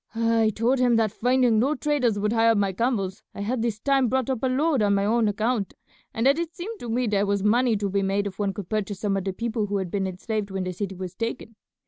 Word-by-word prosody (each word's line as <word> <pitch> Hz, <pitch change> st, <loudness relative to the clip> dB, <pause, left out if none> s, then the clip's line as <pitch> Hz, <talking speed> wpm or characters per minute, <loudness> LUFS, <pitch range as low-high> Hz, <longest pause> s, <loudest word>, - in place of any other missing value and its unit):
I 230 Hz, -1 st, +2 dB
told 245 Hz, +4 st, +1 dB
him 245 Hz, -2 st, +3 dB
that 220 Hz, -2 st, +2 dB
finding 245 Hz, -1 st, +2 dB
no 275 Hz, +6 st, +2 dB
traders 265 Hz, -7 st, 0 dB
would 210 Hz, +2 st, 0 dB
hire 225 Hz, 0 st, +4 dB
my 200 Hz, -2 st, +1 dB
camels 200 Hz, -3 st, -1 dB
I -, -, -5 dB
had 230 Hz, +4 st, -1 dB
this 225 Hz, -2 st, -1 dB
time 270 Hz, +1 st, +2 dB
brought 260 Hz, +1 st, 0 dB
up 255 Hz, -, -2 dB
a 260 Hz, -, +1 dB
load 275 Hz, +1 st, +1 dB
on 200 Hz, -1 st, +3 dB
my 200 Hz, 0 st, +1 dB
own 225 Hz, +1 st, +2 dB
account, 215 Hz, 0 st, -1 dB, 0.4 s
and 230 Hz, -, -2 dB
that 280 Hz, +4 st, +4 dB
it 340 Hz, 0 st, -4 dB
seemed 415 Hz, +5 st, -6 dB
to 240 Hz, -, -7 dB
me 245 Hz, +2 st, 0 dB
there 205 Hz, -2 st, +1 dB
was 200 Hz, -1 st, 0 dB
money 230 Hz, +2 st, +3 dB
to 200 Hz, 0 st, -1 dB
be 200 Hz, +1 st, 0 dB
made 195 Hz, +1 st, 0 dB
if 195 Hz, 0 st, -6 dB
one 200 Hz, -1 st, 0 dB
could 205 Hz, -3 st, -7 dB
purchase 205 Hz, -2 st, -2 dB
some 205 Hz, -1 st, 0 dB
of 195 Hz, -1 st, -2 dB
the 195 Hz, -, 0 dB
people 220 Hz, +1 st, -2 dB
who 200 Hz, 0 st, -1 dB
had 190 Hz, -3 st, -3 dB
been 195 Hz, -2 st, -1 dB
enslaved 205 Hz, +3 st, -3 dB
when 190 Hz, -1 st, -3 dB
the 185 Hz, 0 st, -3 dB
city 195 Hz, +1 st, -4 dB
was 185 Hz, -1 st, -6 dB
taken. 230 Hz, +1 st, -5 dB
220 Hz, 265 wpm, -25 LUFS, 200-245 Hz, 0.4 s, hire